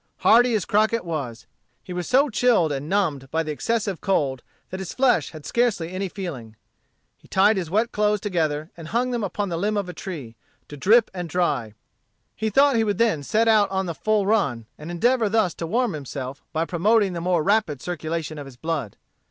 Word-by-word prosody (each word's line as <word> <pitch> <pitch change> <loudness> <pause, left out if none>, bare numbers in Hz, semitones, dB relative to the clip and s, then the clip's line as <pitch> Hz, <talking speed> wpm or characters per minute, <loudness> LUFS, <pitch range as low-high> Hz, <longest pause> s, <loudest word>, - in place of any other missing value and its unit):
Hardy 240 +1 +5
as 205 - 0
Crockett 220 +1 +1
was, 140 -9 -4 0.4
he 180 - -7
was 180 0 -4
so 275 +3 +4
chilled 215 -8 +3
and 145 +2 -4
numbed 155 -10 0
by 165 +3 0
the 155 - -4
excessive 205 +3 -2
cold 140 -9 0 0.3
that 185 - -5
his 190 -2 -6
flesh 250 - +3
had 155 -2 -11
scarcely 220 -9 0
any 190 +1 -3
feeling. 140 - -7 0.6
He - - -21
tied 205 +3 +4
his 180 -5 -3
wet 220 +6 +1
clothes 210 0 +1
together 160 -6 -1
and 165 -2 -9
hung 245 +6 0
them 240 -3 -2
up 195 +1 -5
on 205 -1 0
the 170 - -2
limb 210 +3 0
of 200 -2 -1
a 180 - -6
tree, 155 -10 -7 0.3
to 145 - -8
drip 215 - +4
and 175 -2 -5
dry 140 - -1 0.6
He 220 +1 -1
thought 275 +5 +4
he 225 - +3
would 205 -3 -1
then 220 -10 +2
set 220 +10 +1
out 215 -3 +4
on 190 0 -1
the 170 - -3
full 215 +4 +1
run, 140 - +1
and 150 +2 -9
endeavor 225 +6 +2
thus 215 -4 +2
to 165 - -5
warm 235 +3 0
himself 140 -2 -6
by 160 +1 0
promoting 195 +3 +2
the 170 - -4
more 175 -2 +1
rapid 200 -8 +1
circulation 160 -1 -4
of 145 - -7
his 130 -2 -13
blood. 150 -7 -3
180 Hz, 210 wpm, -23 LUFS, 155-215 Hz, 0.6 s, Hardy